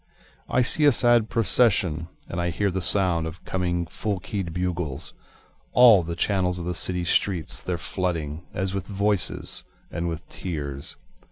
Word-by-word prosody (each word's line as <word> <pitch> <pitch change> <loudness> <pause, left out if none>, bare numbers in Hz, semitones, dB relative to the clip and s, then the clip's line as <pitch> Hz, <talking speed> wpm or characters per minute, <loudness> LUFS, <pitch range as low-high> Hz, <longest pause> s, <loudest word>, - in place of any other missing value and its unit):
I 125 - +3
see 150 +5 +4
a 145 - +7
sad 120 -2 +4
procession, 95 -8 +2 0.2
And 85 - -3
I 85 - 0
hear 100 +4 0
the 95 +1 -2
sound 90 -3 +2
of 80 +2 -10
coming 90 -2 -1
full 100 +3 -3
keyâd 95 -2 -4
bugles, 90 -5 -3 0.6
All 120 -6 +8
the 85 0 -5
channels 90 0 0
of 85 - -4
the 90 - -2
city 90 +1 -1
streets 90 -1 +1
theyâre 90 -1 -3
flooding, 85 -3 -3
As 95 +1 -1
with 95 -1 -4
voices 100 -1 0 0.3
and 85 +1 -3
with 80 0 -6
tears. 70 -6 -6
90 Hz, 160 wpm, -25 LUFS, 85-100 Hz, 0.6 s, All